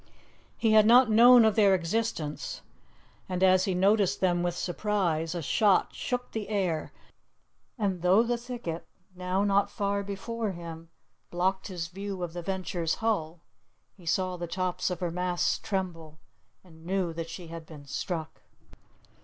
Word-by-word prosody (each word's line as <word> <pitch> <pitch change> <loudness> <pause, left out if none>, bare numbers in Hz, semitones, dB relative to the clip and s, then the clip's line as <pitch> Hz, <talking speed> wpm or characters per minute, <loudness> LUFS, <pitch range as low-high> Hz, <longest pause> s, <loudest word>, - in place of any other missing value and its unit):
He 225 - +2
had 215 -1 +6
not 245 0 +6
known 240 +1 +8
of 220 - +4
their 200 -3 +5
existence, 170 -4 -3 0.7
and 180 0 -1
as 185 0 +5
he 190 - -1
noticed 200 +1 +3
them 175 -2 +2
with 175 -1 -1
surprise, 175 -3 -1
a 170 - -3
shot 200 +6 +3
shook 250 0 -3
the 215 -2 -5
air, 185 -7 -1 0.9
and 195 -6 -1
though 185 +5 +5
the 240 +1 0
thicket, 235 -9 -6 0.3
now 185 +2 -1
not 200 0 +2
far 200 -1 -1
before 205 +2 -4
him, 165 -1 -9 0.4
blocked 190 +2 -1
his 175 -4 -4
view 195 +1 -6
of 170 -2 -5
the 175 - -5
Venture's 180 -2 -2
hull, 175 -8 -2 0.5
he 180 -4 -16
saw 185 +2 0
the 175 0 -5
tops 185 +1 -1
of 180 -1 -4
her 175 -2 -1
masts 180 0 0
tremble, 170 -6 -4 0.5
and 160 -3 -17
knew 180 -1 -1
that 165 0 -5
she 165 0 -8
had 165 -1 -8
been 150 -3 -12
struck. 160 +3 -5
185 Hz, 155 wpm, -28 LUFS, 170-205 Hz, 0.9 s, known